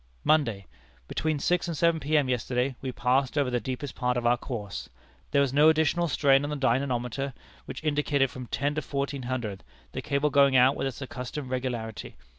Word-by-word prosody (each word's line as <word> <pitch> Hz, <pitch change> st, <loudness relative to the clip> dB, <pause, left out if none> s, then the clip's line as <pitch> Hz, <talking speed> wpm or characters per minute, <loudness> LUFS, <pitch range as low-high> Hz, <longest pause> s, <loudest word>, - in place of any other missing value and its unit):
"Monday. 120 Hz, -11 st, +2 dB, 0.4 s
Between 155 Hz, -1 st, -1 dB
six 175 Hz, +5 st, +1 dB
and 165 Hz, -3 st, -3 dB
seven 170 Hz, 0 st, +3 dB
P.M. 150 Hz, -1 st, +2 dB
yesterday, 125 Hz, +1 st, -1 dB
we 130 Hz, -, -3 dB
passed 125 Hz, +3 st, +1 dB
over 140 Hz, -3 st, +2 dB
the 120 Hz, -, +1 dB
deepest 130 Hz, +2 st, -5 dB
part 125 Hz, -1 st, 0 dB
of 120 Hz, -, -2 dB
our 120 Hz, +1 st, +5 dB
course. 115 Hz, -5 st, -6 dB, 0.4 s
There 140 Hz, -, +3 dB
was 135 Hz, -2 st, -1 dB
no 150 Hz, +2 st, +6 dB
additional 160 Hz, +2 st, +2 dB
strain 135 Hz, -2 st, +3 dB
on 145 Hz, -, -2 dB
the 150 Hz, -, -2 dB
dynamometer, 130 Hz, 0 st, -1 dB, 0.3 s
which -, -, -7 dB
indicated 145 Hz, -3 st, +1 dB
from 125 Hz, -1 st, -8 dB
ten 145 Hz, +4 st, -1 dB
to 155 Hz, -, -2 dB
fourteen 140 Hz, -1 st, -3 dB
hundred, 120 Hz, -6 st, -4 dB, 0.3 s
the -, -, -4 dB
cable 145 Hz, 0 st, 0 dB
going 140 Hz, -1 st, +5 dB
out 130 Hz, +2 st, +6 dB
with -, -, -1 dB
its 135 Hz, +1 st, -5 dB
accustomed 130 Hz, +1 st, -6 dB
regularity. 120 Hz, -4 st, -4 dB
135 Hz, 190 wpm, -27 LUFS, 125-145 Hz, 0.4 s, no